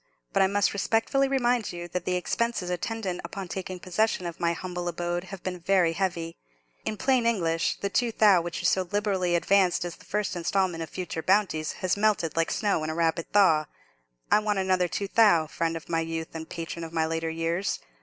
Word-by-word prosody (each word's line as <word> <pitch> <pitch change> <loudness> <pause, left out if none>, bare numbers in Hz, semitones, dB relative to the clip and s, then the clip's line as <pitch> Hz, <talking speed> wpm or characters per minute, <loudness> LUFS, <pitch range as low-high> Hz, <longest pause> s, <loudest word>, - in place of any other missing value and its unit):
But 195 - +3
I 190 - +5
must 205 +1 +1
respectfully 225 +7 +1
remind 245 -4 +1
you 175 0 -6
that 180 -1 -3
the 180 - 0
expenses 190 0 -1
attendant 185 0 -3
upon 195 -2 -6
taking 185 0 -5
possession 185 +1 0
of 170 -1 -6
my 170 0 +1
humble 175 0 -5
abode 175 +1 -2
have 190 -1 -9
been 180 -1 -4
very 175 -2 +2
heavy. 170 -2 -2 0.5
In 215 - -2
plain 255 0 +2
English, 165 -8 +1
the 200 - -1
two 240 -2 +1
thou' 205 -5 +5
which 170 0 -4
you - - -5
so 185 -1 +2
liberally 195 -4 +1
advanced 185 0 +3
as 175 - -6
the - - -18
first 210 -2 -2
instalment 175 0 0
of 160 - -5
future 180 -2 -4
bounties, 185 -5 +1
has 185 - +2
melted 205 -6 +1
like 165 -1 +1
snow 200 -7 0
in 155 - -2
a 160 - -3
rapid 165 0 0
thaw. 160 -7 +4 0.6
I - - +6
want 210 -1 0
another 185 -1 +2
two 200 +3 -3
thou', 195 -7 +5
friend 165 +1 -2
of 160 - -11
my 165 -1 0
youth 165 0 -4
and 160 -1 -7
patron 170 0 -5
of 165 - -7
my 160 -1 +1
later 165 0 -2
years. 165 +4 -1
180 Hz, 205 wpm, -27 LUFS, 165-200 Hz, 0.6 s, I